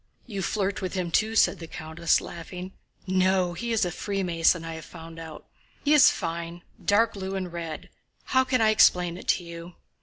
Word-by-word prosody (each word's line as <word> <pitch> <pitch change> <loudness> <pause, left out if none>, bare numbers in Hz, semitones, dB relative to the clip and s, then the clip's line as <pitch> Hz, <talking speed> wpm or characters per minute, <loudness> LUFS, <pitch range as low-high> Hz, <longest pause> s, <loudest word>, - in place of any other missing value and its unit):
"You 200 -5 -5
flirt 195 +1 -1
with 185 0 -4
him 180 -2 -2
too," 220 +4 +1
said - - +4
the 165 - -8
countess, 160 0 0
laughing. 180 +2 -8 0.3
"No, 185 -1 +2
he 235 +7 -4
is 225 -4 +2
a 175 - -2
Freemason, 175 -3 0
I 165 - -5
have 160 -1 -8
found 165 0 -11
out. 160 -2 -9 0.4
He 295 - +4
is 295 -2 +8
fine, 170 0 -4 0.2
dark 220 +3 +3
blue 195 -1 -5
and 185 -3 -4
red.... 165 -2 -6 0.4
How 260 0 +3
can 255 -2 +1
I 220 -1 +5
explain 180 -5 +4
it 185 - -11
to 180 - +2
you?" 170 +1 -9
180 Hz, 190 wpm, -26 LUFS, 170-200 Hz, 0.4 s, is